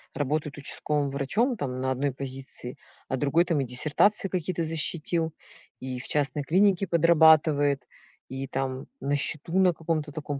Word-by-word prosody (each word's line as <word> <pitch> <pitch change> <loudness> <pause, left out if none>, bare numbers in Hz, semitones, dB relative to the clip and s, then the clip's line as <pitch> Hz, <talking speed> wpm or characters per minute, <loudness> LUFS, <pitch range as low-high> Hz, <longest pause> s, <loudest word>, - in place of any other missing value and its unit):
работает 150 +1 -2
участковым 145 0 -1
врачом 210 - 0
там 130 -5 -4
на 130 0 -1
одной 135 +2 0
позиции, 130 -1 -6 0.3
а 130 - -2
другой 145 +6 +2
там 165 -5 0
и - - -2
диссертации 155 - +2
какие-то 180 -1 -2
защитил, 160 0 -1 0.5
и 130 -1 -5
в - - -8
частной 145 -1 -1
клинике 195 +5 +3
подрабатывает, 155 -4 +4 0.4
и 135 +1 -5
там 135 0 -3
на 140 +1 -1
счету 155 +5 0
на 180 -2 +4
каком-то 155 -2 -3
таком 145 -2 -5
150 Hz, 150 wpm, -26 LUFS, 135-165 Hz, 0.5 s, подрабатывает